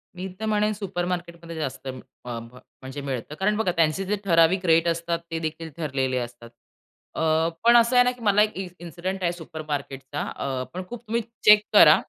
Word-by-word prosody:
मी 185 Hz, +1 st, -5 dB
तर 220 Hz, -, -3 dB
म्हणेन 210 Hz, 0 st, +2 dB
सुपर 195 Hz, -4 st, -3 dB
मार्केटमध्ये 170 Hz, -2 st, -5 dB
जास्त 135 Hz, -4 st, -4 dB
अं, 130 Hz, -1 st, -5 dB, 0.3 s
अ, 120 Hz, -1 st, -4 dB
म 115 Hz, -, -10 dB, 0.3 s
म्हणजे 130 Hz, +2 st, -7 dB
मिळतं. 135 Hz, +1 st, -4 dB
कारण 200 Hz, +5 st, +1 dB
बघा 215 Hz, -5 st, +1 dB
त्यांचे 165 Hz, +3 st, +2 dB
जे 205 Hz, +2 st, 0 dB
ठराविक 175 Hz, +1 st, +4 dB
रेट 165 Hz, 0 st, +4 dB
असतात, 170 Hz, 0 st, 0 dB
ते 165 Hz, -, -1 dB
देखील 160 Hz, 0 st, -4 dB
ठरलेले 135 Hz, -5 st, -1 dB
असतात. 120 Hz, -1 st, -6 dB, 0.7 s
अ, -, -, -2 dB, 0.4 s
पण 235 Hz, +1 st, +7 dB
असं 235 Hz, +2 st, +4 dB
आहे 245 Hz, -, +8 dB
ना 250 Hz, -, +2 dB
की 250 Hz, -1 st, -13 dB
मला 205 Hz, -1 st, +4 dB
एक 215 Hz, 0 st, +3 dB
इ 190 Hz, -1 st, -3 dB
इन्सिडेंट 180 Hz, +3 st, -5 dB
आहे 170 Hz, -, +2 dB
सुपर 165 Hz, -2 st, -8 dB
मार्केटचा 140 Hz, -1 st, -4 dB
अ, 130 Hz, -2 st, -2 dB
पण 185 Hz, +1 st, -4 dB
खूप 240 Hz, -2 st, -7 dB
तुम्ही 230 Hz, +2 st, 0 dB, 0.2 s
चेक 210 Hz, 0 st, +8 dB
करा. -, -, +9 dB
170 Hz, 205 wpm, -25 LUFS, 145-195 Hz, 0.7 s, करा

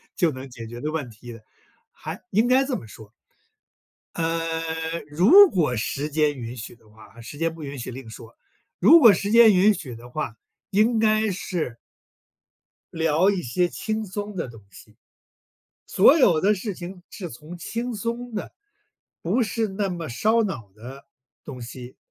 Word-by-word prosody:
就 170 Hz, -5 st, +2 dB
能 130 Hz, 0 st, -8 dB
解 115 Hz, -2 st, -9 dB
决 120 Hz, +1 st, -9 dB
的 150 Hz, +5 st, -3 dB
问 150 Hz, -6 st, -4 dB
题 115 Hz, +2 st, -12 dB
的。 115 Hz, -, -13 dB, 0.5 s
还 -, -, -8 dB
应 220 Hz, +5 st, +3 dB
该 255 Hz, +2 st, +4 dB
这 265 Hz, -, -2 dB
么 -, -, -7 dB
说 105 Hz, 0 st, -14 dB, 1.0 s
呃， 165 Hz, 0 st, -2 dB
如 305 Hz, -, +7 dB
果 150 Hz, -9 st, 0 dB
时 140 Hz, +6 st, -3 dB
间 150 Hz, -2 st, +1 dB
允 120 Hz, +1 st, -6 dB
许 115 Hz, 0 st, -8 dB
的 115 Hz, -2 st, -26 dB
话， 110 Hz, +2 st, -17 dB
时 115 Hz, +5 st, -10 dB
间 165 Hz, 0 st, -1 dB
不 165 Hz, -, -10 dB
允 140 Hz, -1 st, -7 dB
许 120 Hz, -, -6 dB
另 125 Hz, -2 st, -9 dB
说。 115 Hz, 0 st, -12 dB, 0.4 s
如 335 Hz, -, +8 dB
果 235 Hz, -6 st, +9 dB
时 200 Hz, +3 st, -2 dB
间 225 Hz, -1 st, +7 dB
允 195 Hz, +4 st, +5 dB
许 145 Hz, -10 st, -7 dB
的 120 Hz, +2 st, -12 dB
话， 125 Hz, -4 st, -4 dB, 0.3 s
应 220 Hz, +3 st, +2 dB
该 215 Hz, 0 st, +2 dB
是 170 Hz, -, -4 dB, 1.2 s
聊 165 Hz, +3 st, +2 dB
一 195 Hz, -3 st, 0 dB
些 175 Hz, +6 st, 0 dB
轻 220 Hz, +4 st, -4 dB
松 205 Hz, +2 st, -6 dB
的 170 Hz, -, -3 dB
东 115 Hz, -3 st, -13 dB
西， -, -, -16 dB, 0.9 s
所 240 Hz, -, +5 dB
有 175 Hz, -, +4 dB
的 205 Hz, +2 st, +3 dB
事 200 Hz, 0 st, -5 dB
情 180 Hz, +1 st, -9 dB
是 180 Hz, -5 st, -7 dB
从 155 Hz, +8 st, -10 dB
轻 235 Hz, +7 st, -4 dB
松 235 Hz, +2 st, -4 dB
的， 210 Hz, -, -5 dB, 0.7 s
不 250 Hz, -, +1 dB
是 220 Hz, 0 st, -1 dB
那 195 Hz, +1 st, -2 dB
么 170 Hz, -3 st, -5 dB
烧 220 Hz, -, +2 dB
脑 130 Hz, -, -5 dB
的 130 Hz, +5 st, -11 dB, 0.4 s
东 130 Hz, -4 st, -9 dB
西 125 Hz, +1 st, -10 dB
165 Hz, 185 characters per minute, -24 LUFS, 125-210 Hz, 1.2 s, 果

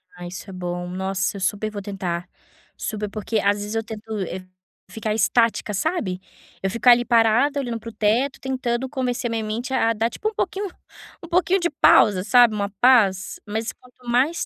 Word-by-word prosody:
Ah, 175 Hz, 0 st, -9 dB
isso 185 Hz, +3 st, -8 dB
é -, -, -8 dB
bom. 175 Hz, -1 st, -4 dB
Nossa! 190 Hz, +2 st, -2 dB
Eu 195 Hz, -, -8 dB
super 205 Hz, +3 st, -1 dB
vou 205 Hz, -1 st, -6 dB
tentar, 185 Hz, -3 st, -4 dB, 0.5 s
super, 210 Hz, -1 st, -4 dB
porque 215 Hz, +2 st, -2 dB
às 200 Hz, 0 st, +2 dB
vezes 210 Hz, +1 st, -5 dB
eu 225 Hz, -, 0 dB
tento, 220 Hz, -1 st, -8 dB, 0.2 s
eh, 185 Hz, 0 st, -5 dB, 0.4 s
ficar 220 Hz, -1 st, -3 dB
estática, 225 Hz, 0 st, +2 dB
sabe? 200 Hz, -, -1 dB, 0.4 s
Eu 195 Hz, -, +1 dB
fico, 235 Hz, +5 st, -3 dB
ali, 240 Hz, 0 st, +7 dB
parada 240 Hz, +5 st, +3 dB
olhando 240 Hz, -4 st, -3 dB
para 230 Hz, -, -8 dB
o -, -, -10 dB
teto, 225 Hz, +6 st, +1 dB
tentando 260 Hz, -1 st, -2 dB
convencer 250 Hz, -3 st, -2 dB
minha 225 Hz, -1 st, -2 dB
mente 235 Hz, +5 st, -4 dB
a 230 Hz, -3 st, +2 dB
dar, 225 Hz, +1 st, 0 dB
tipo, 430 Hz, -, -3 dB
um -, -, -13 dB
pouquinho 400 Hz, -1 st, -2 dB, 0.6 s
um -, -, -8 dB
pouquinho 360 Hz, +2 st, +2 dB
de 345 Hz, -1 st, 0 dB
pausa, 190 Hz, -, +5 dB
sabe, 240 Hz, +1 st, +5 dB
uma 200 Hz, -1 st, -1 dB
paz. 210 Hz, -7 st, +4 dB
Mas 220 Hz, +2 st, -3 dB
quanto 250 Hz, 0 st, -21 dB
mais 270 Hz, +8 st, +2 dB
225 Hz, 190 wpm, -23 LUFS, 200-250 Hz, 0.6 s, ali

